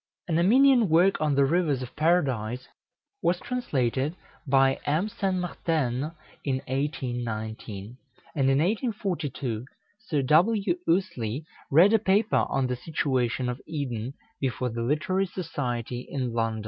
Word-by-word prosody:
An 165 -2 +1
Armenian 245 +3 +5
work 175 +3 +4
on 150 -2 +2
the 140 0 +4
rivers 150 -4 +1
of 125 - -9
Paradise 130 -8 +1 0.5
was 175 +1 +1
translated 145 - -1 0.3
by 135 0 +4
M. 160 +8 +1
Saint 195 -2 -1
Marten 155 -5 -1 0.3
in 135 -2 0
1819; 120 -5 -4 0.4
and 135 -3 +2
in 135 - +3
1842 170 - -1 0.4
Sir 155 -10 -1
W. 180 - +3
Ouseley 145 - 0 0.2
read 175 +9 +6
a 225 - +5
paper 205 +2 +2
on 135 -1 +1
the 125 0 -1
situation 130 -3 -1
of 125 +1 -4
Eden, 130 -5 -4 0.2
before 125 -1 -1
the 115 0 -4
Literary 165 +10 0
Society 125 - -4
in 130 -4 -2
London. 115 -1 0
140 Hz, 130 wpm, -27 LUFS, 125-175 Hz, 0.5 s, read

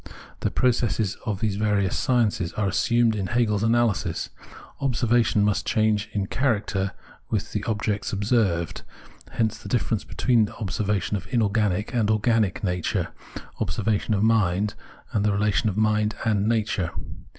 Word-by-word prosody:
The - - 0
processes 115 -5 +1
of 100 -3 -2
these 105 -3 0
various 105 -3 +1
sciences 110 -9 +1
are 105 -2 0
assumed 115 +4 +2
in 95 -3 -2
Hegel's 110 -3 +1
analysis. 115 -5 +1 0.5
Observation 120 -5 +2
must 105 -1 +1
change 110 -1 +1
in 100 -2 -1
character 100 -5 0 0.4
with - - -2
the - - -2
objects 105 -2 -1
observed; 100 -5 0 0.5
hence 110 -1 0
the - - -9
difference 115 -3 0
between 115 -5 +2
observation 105 0 -1
of 95 - -10
inorganic 105 -3 +1
and 115 -4 +1
organic 110 -2 +1
nature, 90 -3 -1 0.5
obser - - -2
vation 110 0 +1
of 100 - +1
mind, 105 -2 +2 0.4
and - - 0
of 105 - +3
the 100 - +1
relation 105 +1 +2
of 100 - -4
mind 110 0 +2
and 105 -2 +2
nature. 110 -6 0
105 Hz, 145 wpm, -25 LUFS, 100-115 Hz, 0.5 s, of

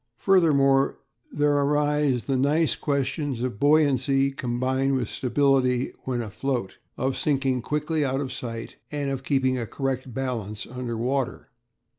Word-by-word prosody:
Furthermore, 140 -8 +3 0.3
there 145 0 +2
arise 145 -2 +2
the 135 - -1
nice 145 +5 +2
questions 140 -2 -1
of 125 -5 -3
buoyancy 140 -2 +3
combined 130 +1 0
with 125 -4 -1
stability 130 -1 +1
when 125 -2 -1
afloat, 115 0 -3 0.2
of 130 0 -1
sinking 135 -3 0
quickly 150 +4 -1
out 135 -1 0
of 135 -2 -3
sight, 115 -2 -6
and 145 -2 -2
of 135 -1 -3
keeping 130 -2 +1
a 115 - -4
correct 130 0 -3
balance 115 -5 -4
under 125 -2 -5
water. 130 +2 -2
135 Hz, 135 wpm, -25 LUFS, 125-145 Hz, 0.3 s, Furthermore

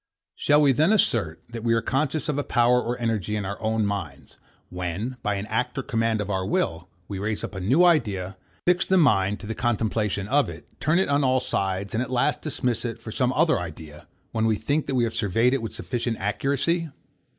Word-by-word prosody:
Shall 145 +1 +3
we 140 - +5
then 155 - +3
assert, 105 - +1
that 115 -1 -7
we 115 -1 +3
are - - +3
conscious 150 +3 -1
of 145 -2 0
a - - 0
power 120 0 +3
or 120 +1 -3
energy 110 -3 -1
in 105 -2 -2
our 100 +2 -5
own 110 -1 +1
minds, 95 -9 -5 0.3
when, 90 +8 -4
by 105 -2 0
an 100 +1 -3
act 125 +4 -2
or 135 - -1
command 115 -2 0
of 105 - -4
our 95 -1 0
will, 85 -3 -1 0.2
we 100 -2 -5
raise 105 +1 -2
up - - -5
a 95 - -5
new 130 - +4
idea, 105 - +1 0.3
fix 180 0 +4
the 190 - +2
mind 105 - +3
to - - -8
the 110 - -3
contemplation 110 -4 -1
of 140 +4 +2
it, - - -10
turn 155 +3 +2
it 190 - +2
on 140 0 +2
all 130 0 +3
sides, 95 -4 -2
and 115 - 0
at 130 - -3
last 130 +3 +1
dismiss 125 -6 -2
it 115 -2 -4
for 110 - -8
some 125 +1 +1
other 160 +4 +3
idea, 80 -3 -9 0.2
when 110 0 +1
we 110 - +3
think 145 +8 -1
that 135 - -1
we 125 - +3
have 115 -1 -1
surveyed 115 +5 +2
it 135 - 0
with 115 - -5
sufficient 120 -2 -2
accuracy? 140 - 0
115 Hz, 225 wpm, -25 LUFS, 100-135 Hz, 0.3 s, we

